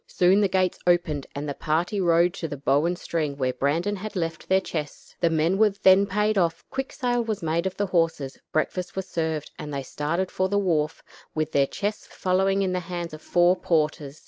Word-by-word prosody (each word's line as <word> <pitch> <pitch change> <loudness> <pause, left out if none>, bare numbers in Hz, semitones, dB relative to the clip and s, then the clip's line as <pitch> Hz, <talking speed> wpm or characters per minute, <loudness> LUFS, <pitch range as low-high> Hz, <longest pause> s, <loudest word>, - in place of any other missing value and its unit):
Soon 185 +3 +3
the 200 - +4
gates 185 -1 +1
opened, 160 -5 +2
and 145 +1 -4
the 145 - -2
party 170 +8 -1
rode 170 0 +3
to 165 - -4
the 145 - -6
Bow 140 +2 +2
and 175 0 -1
String, 155 -5 -2
where 130 -2 0
Brandon 165 +11 0
had 210 +2 -7
left 165 -2 -3
their 190 0 +5
chests. 150 -5 -6
The 170 - +3
men 165 +4 +1
were 220 -1 +6
then 195 0 +4
paid 210 +1 +1
off; 165 -2 0
quick 270 0 -3
sale 245 -2 0
was 220 -5 -3
made 165 +3 0
of 190 - -6
the 205 - +1
horses; 165 -7 0
breakfast 180 +3 -1
was 190 -1 -3
served, 160 -3 -2
and 150 -1 -6
they 140 -1 -3
started 165 +7 -2
for 185 0 0
the 200 - +1
wharf, 160 -5 0 0.3
with 155 0 -1
their 140 -1 +3
chests 205 +6 -4
following 195 +1 +1
in 185 -1 0
the 180 - 0
hands 175 -2 -5
of 155 - -9
four 175 +1 +3
porters. 155 -4 -1
175 Hz, 215 wpm, -25 LUFS, 155-190 Hz, 0.3 s, were